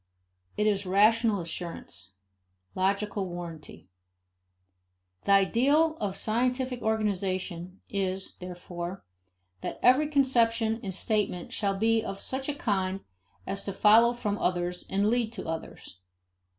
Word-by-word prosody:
It 210 - +2
is 200 -2 +1
rational 215 +1 +4
assurance, 165 - -6 0.6
logical 200 0 0
warranty. 170 - -8 1.4
The - - +2
ideal 275 +11 +4
of 200 -6 -3
scientific 250 +2 0
organization 190 -4 -2
is, 190 -1 -2
therefore, 180 0 -7 0.6
that - - -5
every 265 +5 +5
conception 235 -6 +2
and 195 - -4
statement 195 -2 -1
shall 200 -2 0
be 225 +2 +2
of 195 -2 -5
such 265 +2 -3
a 290 - -1
kind 195 -6 -1 0.4
as 200 0 -3
to 200 - -3
follow 225 +4 +6
from 210 -4 -2
others 180 0 -1
and 195 +1 +1
to - - +3
lead 235 -1 +1
to 190 - -5
others. 160 - -7
200 Hz, 125 wpm, -28 LUFS, 185-230 Hz, 1.4 s, follow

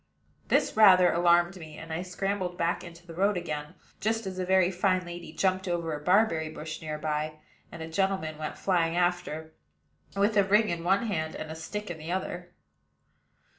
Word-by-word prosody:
This - - +2
rather 185 -4 +7
alarmed 175 +2 +3
me; 155 -3 -10
and 165 0 -7
I 165 - -2
scrambled 185 0 -3
back 170 0 0
into 170 -1 -12
the 170 - -10
road 195 +3 +2
again, 155 -1 -5 0.2
just 225 +1 0
as 185 -1 -5
a 185 - -1
very 190 -1 +4
fine 185 0 +1
lady 175 -2 -8
jumped 185 +2 0
over 170 -2 -1
a 150 0 -5
barberry 180 -4 +3
bush 155 +1 -7
near 155 -1 -4
by, 155 0 -2 0.4
and 165 -1 -7
a - - -6
gentleman 165 -3 -1
went 155 - -4
flying 170 -3 +1
after, 175 -3 -1 0.6
with 205 +2 +2
a 200 - +6
ring 210 +3 +3
in 170 -1 -3
one 195 +5 +2
hand 160 -7 -2
and 155 - -6
a - - -6
stick 210 +5 -5
in 160 - -7
the 160 +2 -6
other. 180 -1 -4
175 Hz, 190 wpm, -28 LUFS, 160-190 Hz, 0.6 s, rather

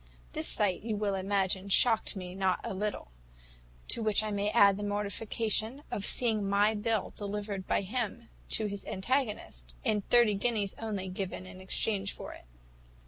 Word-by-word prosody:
This - - -1
sight, 195 -4 +1
you 220 -1 -2
will 205 -1 -1
imagine, 195 0 0
shocked 225 +2 +4
me 180 -2 -6
not 190 -1 +1
a - - -3
little; 205 - -3 0.8
to 235 - +1
which 215 -1 +3
I 215 - -2
may 205 0 0
add 200 -3 +5
the 205 - -4
mortification 215 +4 +1
of 200 - -1
seeing 220 -5 +1
my 205 +2 +3
bill 220 -1 -1
delivered 205 -1 -4
by - - +2
him 230 +2 -3 0.2
to 220 - +2
his 200 -1 -4
antagonist, 190 - -2
and 210 -2 +1
thirty 240 -3 +6
guineas 205 -1 0
only 205 -4 -3
given 185 0 -5
in 185 0 -11
exchange 195 +1 0
for - - -8
it. - - -14
205 Hz, 165 wpm, -30 LUFS, 195-220 Hz, 0.8 s, thirty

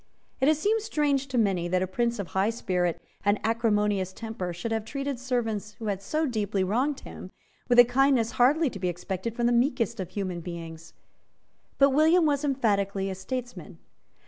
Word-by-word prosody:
It 265 - +2
has 310 0 +4
seemed 430 +7 +1
strange 285 -8 0
to 260 -2 -3
many 195 -6 +1
that 185 +1 +1
a - - +1
Prince 235 +5 -1
of 200 -4 -5
high 195 +3 +1
spirit 180 -6 -1 0.2
and 205 +1 +2
acrimonious 210 -4 +1
temper 220 -5 -5
should 175 +7 -5
have 220 -1 -1
treated 275 +2 -4
servants, 225 -5 -2
who 225 - -7
had 200 -2 -2
so 310 +10 -1
deeply 210 -6 -1
wronged 255 +9 0
him, - - -10 0.4
with 245 - +4
a 245 - +10
kindness 245 -2 +2
hardly 280 +4 +3
to 195 - -8
be 180 -1 0
expected 190 +5 -4
from 240 - 0
the 240 - +3
meekest 235 -2 +1
of 185 -2 -4
human 185 -2 -4
beings. 165 -1 -8 0.8
But 275 0 +5
William 320 +5 +4
was 290 -1 +1
emphatically 200 -8 0
a - - -2
statesman. 245 +6 -6
225 Hz, 185 wpm, -27 LUFS, 190-265 Hz, 0.8 s, a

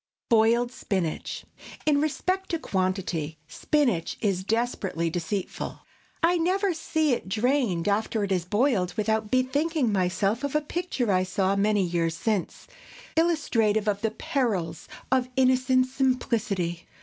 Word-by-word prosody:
BOILED 235 +2 +4
SPINACH. 185 -9 -3 0.4
In 290 -2 +3
respect 370 +5 -1
to 335 - 0
quantity, 185 - -2
spinach 240 - 0
is 190 -3 0
desperately 200 -7 -1
deceitful. 180 +3 -4 0.4
I 350 +2 +4
never 375 +3 +1
see 315 -3 0
it 210 - -3
drained 220 -5 +1
after 210 +1 +1
it 200 - -2
is 180 -3 +1
boiled 205 -4 +1
without 220 0 0
bethinking 260 +1 +1
myself 195 +5 0
of 285 0 -2
a 300 - +3
picture 295 - -2
I 185 -1 +3
saw 190 +1 0
many 205 0 +2
years 170 -2 -1
since, 210 -3 -2 0.5
illustrative 230 -11 +2
of 205 -1 0
the 220 - +1
perils 215 - -2 0.2
of 255 -1 +2
innocent 255 0 +3
simplicity. 230 -9 -1
220 Hz, 130 wpm, -26 LUFS, 190-265 Hz, 0.5 s, BOILED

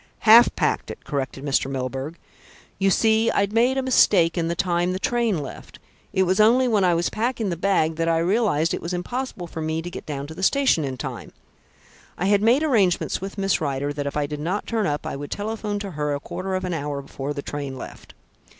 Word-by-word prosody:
"Half 230 +2 +8
packed - - 0
it," - - -9
corrected 135 -1 -4
Mr. 135 -1 +1
Milburgh. 135 +4 -4 0.6
"You 195 0 +3
see, 220 +3 +3
I'd 200 +1 0
made 245 +4 +3
a 265 - 0
mistake 190 -9 +4
in 170 -2 0
the 170 - -1
time 175 0 0
the - - -2
train 235 -3 +1
left. 135 - -10 0.3
It 190 - +2
was 185 +2 +1
only 240 +4 +5
when 215 -5 +2
I 175 -2 +3
was 170 +1 0
packing 230 -1 -1
the - - -1
bag 165 -3 +1
that 165 0 0
I 165 - +2
realised 170 -3 +1
it - - -3
was 175 +2 -3
impossible 240 +1 -4
for 165 -1 -7
me 160 +1 -1
to 175 - -6
get - - -8
down 140 -2 -4
to 155 - -9
the 175 - -8
station 260 - +3
in 135 -2 -4
time. - - -7 0.8
I 180 - -1
had 200 0 +3
made 240 +7 +4
arrangements 205 - +1
with 195 +2 -6
Miss 195 -3 +1
Rider 145 -1 -2
that 145 -1 -3
if 140 - -3
I 145 - +1
did 150 0 -5
not 180 +7 -2
turn 220 -4 -1
up 145 0 -2
I - - -3
would 145 0 -6
telephone 210 0 -3
to 200 -1 -5
her 150 -2 -2
a - - -4
quarter 185 +5 -4
of 185 0 -2
an 180 - -2
hour 145 -3 -3
before 140 +1 -5
the 140 - -5
train 140 -2 -5
left. - - -10
175 Hz, 230 wpm, -23 LUFS, 150-210 Hz, 0.8 s, Half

